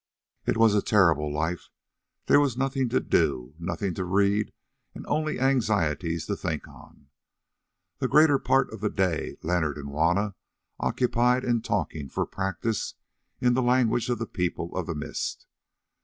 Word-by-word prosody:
It -, -, +1 dB
was 115 Hz, -2 st, +5 dB
a 105 Hz, -, +3 dB
terrible 85 Hz, -9 st, +3 dB
life; 80 Hz, +4 st, -2 dB, 0.6 s
there -, -, +6 dB
was 140 Hz, -5 st, +1 dB
nothing 135 Hz, -1 st, 0 dB
to -, -, +2 dB
do, 60 Hz, +2 st, 0 dB
nothing 95 Hz, +2 st, -2 dB
to 95 Hz, -, -3 dB
read, 100 Hz, +3 st, +1 dB, 0.4 s
and -, -, -8 dB
only 155 Hz, +1 st, -1 dB
anxieties 90 Hz, -, +1 dB
to 100 Hz, -, -2 dB
think 80 Hz, -6 st, -4 dB
on. 70 Hz, -, -17 dB, 0.9 s
The -, -, 0 dB
greater 150 Hz, -2 st, +5 dB
part 135 Hz, -4 st, +2 dB
of 110 Hz, -, -8 dB
the 105 Hz, -, +1 dB
day 90 Hz, -6 st, -1 dB
Leonard 80 Hz, -3 st, 0 dB
and 70 Hz, -1 st, -7 dB
Juanna 85 Hz, +8 st, +1 dB, 0.5 s
occupied 125 Hz, +1 st, +2 dB
in 120 Hz, -2 st, +1 dB
talking, 75 Hz, -9 st, -2 dB
for -, -, -1 dB
practice, 95 Hz, +3 st, -3 dB, 0.4 s
in 125 Hz, -1 st, +3 dB
the 130 Hz, -, +2 dB
language 120 Hz, -1 st, +2 dB
of 120 Hz, -, +1 dB
the 115 Hz, -, -3 dB
People 90 Hz, -3 st, -3 dB
of 90 Hz, -3 st, -2 dB
the 80 Hz, -, -3 dB
Mist. 75 Hz, 0 st, -4 dB
100 Hz, 155 wpm, -26 LUFS, 80-120 Hz, 0.9 s, there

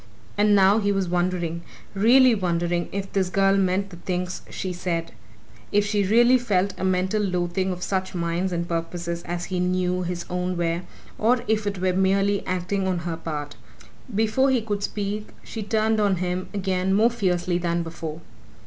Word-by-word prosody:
And 205 Hz, 0 st, +4 dB
now 195 Hz, +2 st, +5 dB
he 205 Hz, -1 st, +1 dB
was 195 Hz, -2 st, 0 dB
wondering 175 Hz, -1 st, -1 dB, 0.3 s
really 245 Hz, +5 st, +6 dB
wondering 175 Hz, -3 st, 0 dB
if 195 Hz, 0 st, -4 dB
this 190 Hz, -2 st, +1 dB
girl 195 Hz, +1 st, +3 dB
meant 195 Hz, +1 st, +1 dB
the 175 Hz, -, -10 dB
things 180 Hz, +1 st, -3 dB
she 185 Hz, -1 st, -4 dB
said: 170 Hz, -2 st, -3 dB, 0.6 s
if 205 Hz, 0 st, +3 dB
she 205 Hz, 0 st, +1 dB
really 240 Hz, +6 st, +5 dB
felt 200 Hz, -5 st, +1 dB
a -, -, -3 dB
mental 185 Hz, +3 st, +1 dB
loathing 180 Hz, -1 st, 0 dB
of 180 Hz, 0 st, -5 dB
such 190 Hz, -1 st, -2 dB
minds 170 Hz, +2 st, -1 dB
and 170 Hz, -1 st, -2 dB
purposes 170 Hz, 0 st, -3 dB
as 175 Hz, +1 st, -3 dB
he 180 Hz, -, 0 dB
knew 180 Hz, 0 st, 0 dB
his 175 Hz, -1 st, -3 dB
own 180 Hz, 0 st, -2 dB
were, 170 Hz, 0 st, 0 dB, 0.4 s
or 240 Hz, +2 st, +3 dB
if 215 Hz, -1 st, +1 dB
it 200 Hz, -1 st, -2 dB
were 185 Hz, 0 st, +1 dB
merely 195 Hz, +2 st, +2 dB
acting 185 Hz, +2 st, -1 dB
on 185 Hz, -1 st, 0 dB
her 170 Hz, -2 st, -2 dB
part. 150 Hz, -3 st, -5 dB, 0.6 s
Before 225 Hz, +5 st, +2 dB
he 255 Hz, -4 st, +2 dB
could 205 Hz, -2 st, -2 dB
speak 205 Hz, +1 st, -3 dB, 0.2 s
she 225 Hz, -, -6 dB
turned 220 Hz, +1 st, +1 dB
on 200 Hz, -2 st, +3 dB
him 180 Hz, +1 st, -3 dB
again 190 Hz, -1 st, 0 dB
more 225 Hz, +4 st, +4 dB
fiercely 180 Hz, -5 st, 0 dB
than 170 Hz, -1 st, 0 dB
before. 165 Hz, -1 st, -6 dB
185 Hz, 175 wpm, -24 LUFS, 175-205 Hz, 0.6 s, really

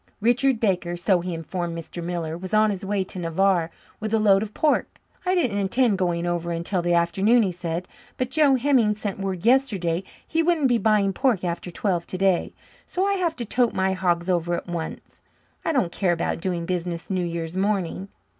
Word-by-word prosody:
Richard 245 Hz, +3 st, +2 dB
Baker, 180 Hz, -5 st, 0 dB
so 180 Hz, +1 st, +2 dB
he 180 Hz, +1 st, -4 dB
informed 170 Hz, +1 st, -4 dB
Mr. 165 Hz, +1 st, -7 dB
Miller, 170 Hz, -2 st, -3 dB
was 185 Hz, +4 st, -3 dB
on 215 Hz, 0 st, +4 dB
his 195 Hz, -1 st, -5 dB
way 195 Hz, 0 st, 0 dB
to 185 Hz, 0 st, -7 dB
Navarre 170 Hz, 0 st, +1 dB, 0.3 s
with 215 Hz, +1 st, -1 dB
a -, -, +4 dB
load 200 Hz, -2 st, +4 dB
of 215 Hz, -1 st, -4 dB
pork. 300 Hz, +6 st, 0 dB, 0.3 s
"I 370 Hz, -, +3 dB
didn't 245 Hz, -, +1 dB
intend 200 Hz, +1 st, +2 dB
going 175 Hz, -2 st, 0 dB
over 175 Hz, -1 st, -1 dB
until 170 Hz, +2 st, -1 dB
the 175 Hz, 0 st, +1 dB
afternoon," 195 Hz, +8 st, +3 dB
he 190 Hz, -, 0 dB
said, 175 Hz, 0 st, -4 dB, 0.3 s
"but 255 Hz, 0 st, -2 dB
Joe 290 Hz, -2 st, +4 dB
Hemming 250 Hz, -5 st, +3 dB
sent 205 Hz, -2 st, -4 dB
word 190 Hz, -1 st, -3 dB
yesterday 200 Hz, -10 st, +2 dB, 0.2 s
he 330 Hz, -, +1 dB
wouldn't 325 Hz, -5 st, +2 dB
be 240 Hz, -1 st, +3 dB
buying 210 Hz, -3 st, +2 dB
pork 245 Hz, -8 st, +1 dB
after 175 Hz, 0 st, -3 dB
twelve 175 Hz, -1 st, -1 dB
today. 190 Hz, -1 st, +1 dB, 0.4 s
So 370 Hz, +2 st, -1 dB
I 400 Hz, -, +2 dB
have 350 Hz, -4 st, 0 dB
to 240 Hz, -, -5 dB
tote 240 Hz, +2 st, +1 dB
my 190 Hz, 0 st, +1 dB
hogs 175 Hz, -2 st, 0 dB
over 175 Hz, -1 st, +1 dB
at -, -, -5 dB
once. 170 Hz, -2 st, -6 dB, 0.4 s
I -, -, 0 dB
don't 250 Hz, -, +1 dB
care 180 Hz, -1 st, +1 dB
about 170 Hz, 0 st, -2 dB
doing 175 Hz, -2 st, -2 dB
business 175 Hz, 0 st, -3 dB
New 185 Hz, -1 st, 0 dB
Year's 170 Hz, 0 st, -4 dB
morning." 195 Hz, -1 st, -1 dB
190 Hz, 200 wpm, -24 LUFS, 175-225 Hz, 0.4 s, on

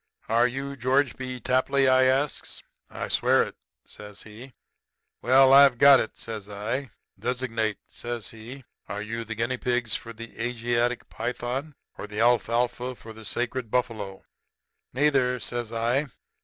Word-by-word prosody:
"'Are 115 Hz, +2 st, +3 dB
you 135 Hz, +3 st, -5 dB
George 130 Hz, +1 st, +1 dB
B. 130 Hz, -1 st, -6 dB
Tapley?' 130 Hz, +3 st, +2 dB
I 130 Hz, 0 st, +5 dB
asks. 135 Hz, +3 st, -1 dB, 0.3 s
"'I -, -, -5 dB
swear -, -, +3 dB
it,' -, -, -8 dB, 0.3 s
says 105 Hz, -1 st, -11 dB
he. 115 Hz, +5 st, -12 dB, 0.7 s
"'Well, 130 Hz, +2 st, +6 dB
I've 140 Hz, -2 st, +7 dB
got 140 Hz, +1 st, +8 dB
it,' -, -, -4 dB
says 110 Hz, -3 st, -7 dB
I. 115 Hz, +7 st, -3 dB, 0.3 s
"'Designate,' 115 Hz, -3 st, -1 dB
says 120 Hz, -2 st, -6 dB
he. 120 Hz, +5 st, -10 dB, 0.3 s
'Are 100 Hz, +2 st, -4 dB
you 115 Hz, +2 st, -4 dB
the 115 Hz, 0 st, -6 dB
guinea 115 Hz, +4 st, -1 dB
pigs 120 Hz, -2 st, 0 dB
for 115 Hz, -, -6 dB
the 115 Hz, 0 st, -9 dB
Asiatic 120 Hz, 0 st, -1 dB
python 125 Hz, +5 st, -4 dB, 0.2 s
or -, -, -5 dB
the 105 Hz, 0 st, -6 dB
alfalfa 120 Hz, +2 st, +1 dB
for 110 Hz, +1 st, -12 dB
the 110 Hz, 0 st, -12 dB
sacred 120 Hz, +1 st, -2 dB
buffalo?' 110 Hz, -5 st, -2 dB, 0.7 s
"'Neither,' 130 Hz, -2 st, +2 dB
says 120 Hz, -1 st, -4 dB
I. 120 Hz, +6 st, 0 dB
120 Hz, 145 wpm, -26 LUFS, 115-130 Hz, 0.7 s, got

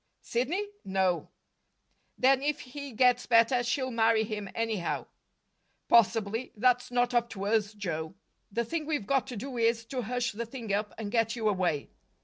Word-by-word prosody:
"Sidney? 295 Hz, +13 st, -1 dB, 0.2 s
No." 190 Hz, -2 st, 0 dB, 0.9 s
"Then, 265 Hz, +1 st, +4 dB
if 290 Hz, +1 st, -1 dB
he 280 Hz, +2 st, -8 dB
gets 250 Hz, +1 st, +3 dB
better, 235 Hz, +2 st, +5 dB
she'll 260 Hz, +2 st, -1 dB
marry 225 Hz, -1 st, +3 dB
him 210 Hz, -2 st, -5 dB
anyhow." 220 Hz, -6 st, -1 dB, 0.8 s
"Possibly. 225 Hz, +1 st, +3 dB
That's 245 Hz, +3 st, +2 dB
not 245 Hz, 0 st, +1 dB
up 240 Hz, -1 st, +2 dB
to 195 Hz, -3 st, -5 dB
us, 210 Hz, 0 st, +1 dB
Joe. 165 Hz, -4 st, -4 dB, 0.4 s
The 235 Hz, +3 st, -1 dB
thing 310 Hz, +5 st, -3 dB
we've 295 Hz, -10 st, -1 dB
got 270 Hz, +2 st, +1 dB
to 250 Hz, -4 st, -6 dB
do 250 Hz, +2 st, -5 dB
is 230 Hz, 0 st, +2 dB
to 260 Hz, -2 st, -2 dB
hush 245 Hz, +2 st, -1 dB
the 230 Hz, +3 st, -5 dB
thing 230 Hz, -4 st, -5 dB
up, 210 Hz, +1 st, -1 dB
and 210 Hz, -2 st, -5 dB
get 225 Hz, -1 st, +1 dB
you 225 Hz, -2 st, -1 dB
away." 180 Hz, -8 st, 0 dB
230 Hz, 165 wpm, -29 LUFS, 210-250 Hz, 0.9 s, better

